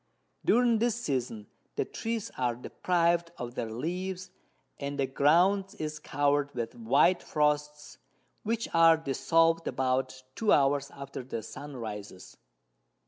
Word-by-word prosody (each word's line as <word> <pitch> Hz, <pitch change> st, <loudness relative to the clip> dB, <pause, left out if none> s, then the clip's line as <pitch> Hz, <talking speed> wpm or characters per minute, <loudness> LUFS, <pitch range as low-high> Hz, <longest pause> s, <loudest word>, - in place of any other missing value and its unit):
During 235 Hz, -1 st, +4 dB
this 235 Hz, -1 st, +1 dB
Season 125 Hz, -, -3 dB, 0.3 s
the -, -, 0 dB
Trees 225 Hz, -2 st, -4 dB
are 125 Hz, -2 st, 0 dB
depriv'd 170 Hz, +6 st, 0 dB
of 120 Hz, -1 st, -6 dB
their 115 Hz, -2 st, -3 dB
Leaves, 180 Hz, +8 st, -4 dB, 0.5 s
and 140 Hz, 0 st, -4 dB
the 135 Hz, -, +1 dB
Ground 175 Hz, +9 st, +3 dB
is 155 Hz, 0 st, -4 dB
cover'd 145 Hz, -1 st, 0 dB
with 115 Hz, -2 st, -3 dB
white 120 Hz, +10 st, +3 dB
Frosts, 150 Hz, 0 st, -1 dB, 0.4 s
which 230 Hz, +1 st, -1 dB
are 165 Hz, -1 st, +6 dB
dissolved 165 Hz, +2 st, +2 dB
about 130 Hz, 0 st, -1 dB
2 220 Hz, -2 st, +2 dB
hours 140 Hz, 0 st, +3 dB
after 140 Hz, -1 st, -8 dB
the 120 Hz, -3 st, -5 dB
Sun 145 Hz, +5 st, -8 dB
rises. 105 Hz, -4 st, -8 dB
150 Hz, 130 wpm, -29 LUFS, 130-175 Hz, 0.5 s, are